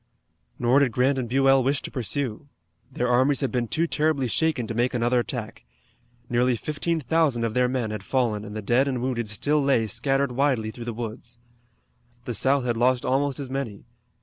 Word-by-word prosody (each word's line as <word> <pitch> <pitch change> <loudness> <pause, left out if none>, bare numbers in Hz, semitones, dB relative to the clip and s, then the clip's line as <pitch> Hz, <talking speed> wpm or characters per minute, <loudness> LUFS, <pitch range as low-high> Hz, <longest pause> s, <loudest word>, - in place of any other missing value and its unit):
Nor 125 +3 +3
did 135 -5 +2
Grant 130 +2 +2
and 120 -3 -4
Buell 135 +1 +4
wish 135 +1 0
to - - -6
pursue. 130 0 -3 0.4
Their 125 -1 -1
armies 130 +4 +3
had 135 - -1
been 120 -2 -1
too 160 +8 0
terribly 155 -4 0
shaken 140 0 0
to 115 - -5
make 120 +3 0
another 120 +1 +2
attack. 120 - -5 0.6
Nearly 120 +1 +2
fifteen 155 +6 -2
thousand 145 -4 +1
of 115 -2 -1
their 125 +1 +2
men 125 -4 -2
had 105 - -4
fallen 115 -6 0
and 105 0 -8
the 110 - -5
dead 120 +6 +2
and 130 -3 -2
wounded 120 -4 -2
still 145 +8 0
lay 135 -5 +2
scattered 135 +5 0
widely 125 -4 0
through 120 +1 -9
the 120 - -3
woods. 115 +1 -7 0.9
The 120 - -3
South 135 +4 +2
had 120 -2 0
lost 125 +1 +2
almost 135 +1 0
as 135 -2 -6
many. 130 -7 -4
125 Hz, 195 wpm, -25 LUFS, 120-140 Hz, 0.9 s, Buell